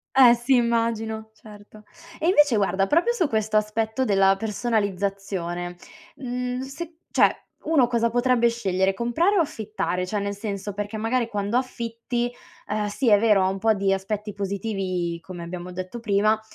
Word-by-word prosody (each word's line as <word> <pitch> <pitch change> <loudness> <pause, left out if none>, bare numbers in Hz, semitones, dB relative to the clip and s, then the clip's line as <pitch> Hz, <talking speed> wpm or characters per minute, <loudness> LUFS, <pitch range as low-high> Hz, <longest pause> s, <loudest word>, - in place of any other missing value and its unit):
Eh 250 -3 +8
sì 245 +2 +2
immagino, 225 -2 0
certo. 210 0 -15 0.3
E 320 - -1
invece 295 - +5
guarda 195 -1 +1
proprio 340 - +3
su 355 -11 0
questo 215 -1 0
aspetto 220 +4 0
della 195 -3 +4
personalizzazione, 195 -5 -2 0.4
mhmm, 250 0 -3
se 320 +5 -7
cioè, - - +4 0.2
uno 300 -5 +3
cosa 235 -1 +1
potrebbe 245 0 +3
scegliere, 190 -4 0
comprare 240 - +1
o 365 - +5
affittare? 215 - -3
Cioè 205 +2 -2
nel 200 0 -2
senso, 200 -1 -5
perché 205 +2 -4
magari 230 +2 0
quando 205 +2 -2
affitti, 240 -1 -3 0.4
ehm, 210 0 -1
sì 220 +4 0
è 205 - +7
vero, 210 -3 +4
ha 185 - +2
un 195 - -2
po' 220 +2 +3
di 195 -1 +1
aspetti 210 +2 -3
positivi 195 -4 -3
come 175 0 -9
abbiamo 175 +1 -6
detto 185 +5 -6
prima, 215 0 +2
215 Hz, 160 wpm, -24 LUFS, 195-240 Hz, 0.4 s, Eh